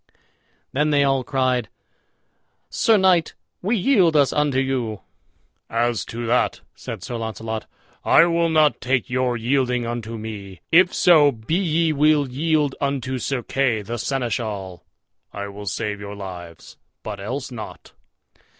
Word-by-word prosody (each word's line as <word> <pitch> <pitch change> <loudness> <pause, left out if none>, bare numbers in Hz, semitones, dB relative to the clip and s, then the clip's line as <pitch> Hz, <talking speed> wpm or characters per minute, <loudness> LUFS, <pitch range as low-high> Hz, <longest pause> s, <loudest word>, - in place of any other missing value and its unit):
Then 150 +3 +1
they 145 -1 +3
all 135 -2 +2
cried, 125 -2 0 1.0
"Sir 225 -1 +3
knight, 185 -4 +3 0.3
we 215 +6 0
yield 185 - +3
us 145 -3 +4
unto 150 -3 +1
you." 125 -6 -1 0.7
"As 120 0 0
to 120 +1 -5
that," 120 +2 +1
said - - -8
Sir 120 - -4
Launcelot, 110 -1 -5 0.4
"I - - +6
will 170 -1 +1
not 155 -2 +3
take 130 -1 0
your 130 -1 0
yielding 125 0 0
unto 115 -1 -4
me. 100 -4 -8
If 180 +2 +6
so 155 -5 +5
be 115 +4 -6
ye 165 -3 +1
will 150 -1 +3
yield 150 +1 0
you - - -15
unto 130 -2 -3
Sir 125 +1 -2
Kay 125 -5 0
the 115 +3 -5
Seneschal, 110 -8 -3 0.5
I 100 0 -5
will 100 +1 -9
save 105 +1 -3
your 100 0 -7
lives, 90 -4 -9 0.3
but 105 -2 -6
else 130 +7 -5
not." 115 -3 -9
125 Hz, 145 wpm, -22 LUFS, 110-150 Hz, 1.0 s, I